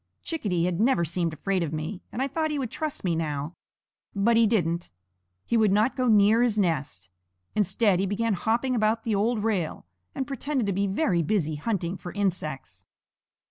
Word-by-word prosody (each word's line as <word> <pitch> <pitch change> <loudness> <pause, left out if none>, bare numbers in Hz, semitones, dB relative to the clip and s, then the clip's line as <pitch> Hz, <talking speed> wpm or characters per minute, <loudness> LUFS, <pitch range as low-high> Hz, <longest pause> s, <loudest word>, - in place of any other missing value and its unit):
Chickadee 205 - -1
had 180 -1 -1
never 220 -7 +3
seemed 170 +1 -1
afraid 185 +5 -1
of 160 -3 -2
me, 160 +5 -4
and 255 - -2
I - - 0
thought 315 +3 -1
he 300 - -2
would 255 -5 -3
trust 310 +1 -4
me 175 -3 +1
now. 150 -1 -3 0.6
But 215 +4 +3
he 230 -1 +5
didn't. 170 -6 0 0.5
He - - 0
would 215 -3 +4
not 215 +5 +2
go 255 -1 0
near 215 +1 +5
his 235 -3 +2
nest. 145 - -1 0.4
Instead 200 -1 +2
he 195 - +1
began 215 +3 0
hopping 230 +7 0
about 220 -1 +1
the 225 - -1
old 210 +2 +1
rail, 195 -8 -1 0.3
and 265 - -2
pretended 275 -2 -2
to 200 - 0
be 200 +2 0
very 190 - +1
busy 160 -2 0
hunting 175 +2 -2
for 175 - -8
insects. 180 -9 -3
200 Hz, 185 wpm, -26 LUFS, 170-230 Hz, 0.6 s, he